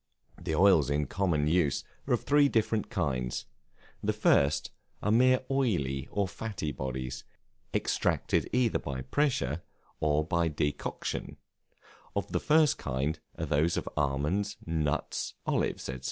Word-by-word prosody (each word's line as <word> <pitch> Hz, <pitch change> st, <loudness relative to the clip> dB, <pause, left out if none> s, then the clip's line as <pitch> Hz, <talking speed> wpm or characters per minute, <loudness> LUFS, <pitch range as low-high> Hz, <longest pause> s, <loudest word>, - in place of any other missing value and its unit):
The 85 Hz, -3 st, -1 dB
oils 85 Hz, -6 st, +5 dB
in 75 Hz, +1 st, +1 dB
common 85 Hz, -2 st, 0 dB
use 80 Hz, -2 st, +2 dB, 0.2 s
are -, -, +4 dB
of -, -, -6 dB
three 145 Hz, 0 st, +5 dB
different 110 Hz, -2 st, +1 dB
kinds. 65 Hz, -, -1 dB, 0.6 s
The -, -, 0 dB
first 70 Hz, +1 st, +3 dB, 0.3 s
are 105 Hz, -, +2 dB
mere 130 Hz, +3 st, +5 dB
oily 70 Hz, -, 0 dB
or 100 Hz, -1 st, 0 dB
fatty 95 Hz, -5 st, -4 dB
bodies, 65 Hz, -1 st, -4 dB, 0.5 s
extracted -, -, 0 dB
either 125 Hz, -2 st, +2 dB
by 65 Hz, -2 st, -5 dB
pressure, 85 Hz, -, 0 dB, 0.4 s
or 75 Hz, 0 st, +2 dB
by 85 Hz, +1 st, +1 dB
decoction: 75 Hz, -2 st, -3 dB, 0.8 s
of -, -, -2 dB
the -, -, +1 dB
first 155 Hz, -1 st, +4 dB
kind 70 Hz, +3 st, -1 dB, 0.2 s
are -, -, -2 dB
those 80 Hz, +4 st, +2 dB
of -, -, -3 dB
almonds, 75 Hz, +9 st, 0 dB
nuts, 80 Hz, -3 st, -1 dB
olives, -, -, 0 dB
&c. 65 Hz, -1 st, -5 dB
80 Hz, 135 wpm, -30 LUFS, 70-105 Hz, 0.8 s, oils